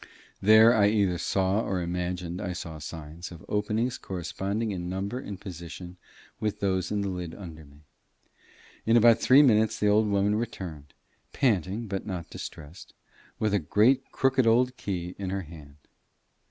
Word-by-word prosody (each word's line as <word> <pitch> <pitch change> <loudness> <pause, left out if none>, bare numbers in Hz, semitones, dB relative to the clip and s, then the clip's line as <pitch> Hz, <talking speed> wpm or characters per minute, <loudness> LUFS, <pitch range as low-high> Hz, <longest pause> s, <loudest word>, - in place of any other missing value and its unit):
There 110 +3 +7
I 105 -4 +4
either 100 -5 +1
saw 95 +2 +1
or 95 -4 -2
imagined 90 +1 -3
I 90 -3 -3
saw 80 -3 -7
signs 80 +3 -8
of 85 -2 -12
openings 110 +4 -1
corresponding 100 +4 -3
in 90 -2 -4
number 100 +6 -3
and 100 -7 -7
position 90 -1 -9 0.4
with 105 -1 -2
those 95 -2 0
in 105 -1 -1
the 100 - -2
lid 90 -3 -5
under 80 -5 -10
me. 70 +1 -19 1.0
In 115 +1 +4
about 115 0 +6
three 135 +5 +6
minutes 110 -4 +3
the 105 - +3
old 105 +1 +4
woman 100 +1 +2
returned, 90 -10 -5 0.4
panting 105 - 0
but 95 -2 -4
not 90 -4 -5
distressed, 80 +4 -9 0.4
with 105 -1 0
a 105 - +3
great 115 - +2
crooked 130 -2 +2
old 125 +3 +3
key 90 -5 -4
in 95 -2 -3
her 95 +1 -2
hand. 75 -3 -13
95 Hz, 160 wpm, -27 LUFS, 90-110 Hz, 1.0 s, There